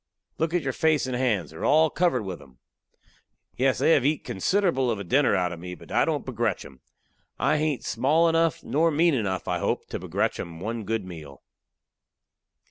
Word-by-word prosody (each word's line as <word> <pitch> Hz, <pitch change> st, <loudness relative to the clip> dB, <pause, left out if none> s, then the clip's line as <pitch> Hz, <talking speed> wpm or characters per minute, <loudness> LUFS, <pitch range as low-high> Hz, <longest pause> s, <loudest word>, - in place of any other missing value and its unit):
"Look 160 Hz, +2 st, 0 dB
at 175 Hz, -, +1 dB
your 135 Hz, -1 st, -2 dB
face 155 Hz, -1 st, +2 dB
and 130 Hz, -1 st, -3 dB
hands; 110 Hz, -, 0 dB
they 80 Hz, -, -12 dB
are -, -, -7 dB
all 155 Hz, +1 st, +4 dB
covered 170 Hz, -10 st, +1 dB
with 95 Hz, -3 st, -6 dB
'em." 65 Hz, -2 st, -18 dB, 1.0 s
"Yes, 130 Hz, +1 st, +2 dB
they -, -, +3 dB
have 140 Hz, -, +4 dB
eat 150 Hz, +2 st, +1 dB
considerable 135 Hz, -, +1 dB
of 115 Hz, -, 0 dB
a 100 Hz, -, -5 dB
dinner 130 Hz, +5 st, +2 dB
out 90 Hz, -2 st, 0 dB
of 85 Hz, -, -7 dB
me, 90 Hz, +1 st, -7 dB
but -, -, -15 dB
I -, -, +3 dB
don't -, -, -2 dB
begrech -, -, -2 dB
'em. 65 Hz, -, -14 dB, 0.6 s
I 155 Hz, -, +2 dB
hain't 150 Hz, -3 st, -1 dB
small 160 Hz, +5 st, +2 dB
enough, 165 Hz, -1 st, +1 dB
nor 160 Hz, +4 st, +2 dB
mean 165 Hz, +2 st, +3 dB
enough, 100 Hz, -7 st, -2 dB
I 90 Hz, -1 st, -1 dB
hope, -, -, -1 dB
to -, -, -4 dB
begrech -, -, -1 dB
'em 85 Hz, -1 st, -7 dB
one 110 Hz, +3 st, -4 dB
good 110 Hz, -1 st, -2 dB
meal." 75 Hz, -7 st, -10 dB
130 Hz, 205 wpm, -25 LUFS, 95-155 Hz, 1.0 s, all